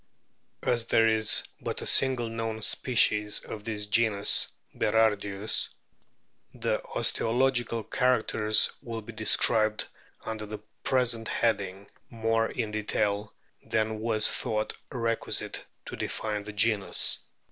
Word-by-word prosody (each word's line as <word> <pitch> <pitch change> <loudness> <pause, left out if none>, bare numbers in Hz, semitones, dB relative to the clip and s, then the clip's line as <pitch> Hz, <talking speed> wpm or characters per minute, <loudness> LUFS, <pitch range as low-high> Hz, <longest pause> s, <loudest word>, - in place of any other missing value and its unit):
As 115 -1 +1
there 115 0 +4
is 110 -1 +3 0.2
but - - -4
a - - -6
single 130 -3 +4
known 115 -1 -4
species 105 -5 +2
of 105 - -8
this 105 -2 -3
genus 105 -1 +3 0.3
Berardius, 105 -2 +1 0.9
the - - -1
osteological 120 -1 0
characters 110 -3 +3
will 115 -2 -6
be 115 - -10
described 110 0 +2 0.4
under 110 -1 -5
the 105 +1 -6 0.3
present 120 -3 +1
heading 100 -3 -1 0.2
more 115 -1 0
in 110 -4 -3
detail 105 -1 -1 0.3
than 110 0 -1
was 110 -1 +2
thought 110 0 -1 0.2
requisite 115 -2 -3 0.2
to - - -7
define 105 -1 -3
the 105 +1 -8
genus. 105 -1 +1
110 Hz, 115 wpm, -28 LUFS, 105-115 Hz, 0.9 s, there